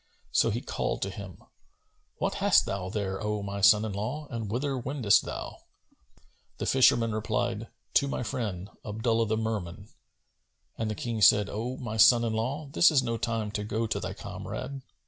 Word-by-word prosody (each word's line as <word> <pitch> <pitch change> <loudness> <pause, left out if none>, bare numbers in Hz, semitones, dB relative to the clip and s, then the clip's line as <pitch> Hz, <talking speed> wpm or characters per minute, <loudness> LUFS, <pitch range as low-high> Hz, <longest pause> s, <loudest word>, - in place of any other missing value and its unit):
So - - +3
he - - -2
called - - -2
to 95 - -3
him, 95 -2 -9 0.7
"What - - -1
hast - - +5
thou 95 -1 -3
there, 95 -2 -3
O 105 -1 -2
my 100 0 -4
son 105 +1 +6
in 105 - -4
law, 125 +10 -4
and 115 -4 -4
whither 135 +5 -1
wendest 125 -4 +2
thou?" - - -6 1.0
The - - -3
fisherman 120 -3 +4
replied, 110 0 -2 0.3
"To 140 - -2
my 135 - -2
friend, 100 -4 -4
Abdullah 115 +2 0
the 110 +1 0
Merman;" 105 -3 -4 0.9
and 110 -1 -2
the 110 - -2
King 115 -1 -3
said, 105 +1 +5
"O 120 +5 -4
my 110 -4 -5
son 115 +2 +7
in 115 -1 -1
law, 130 +7 -2
this 170 - +6
is 140 -5 +3
no 115 -2 -1
time 110 -1 -2
to 105 -1 -3
go 110 +2 -1
to 110 - -2
thy - - -5
comrade." 135 0 -6
110 Hz, 180 wpm, -28 LUFS, 105-120 Hz, 1.0 s, son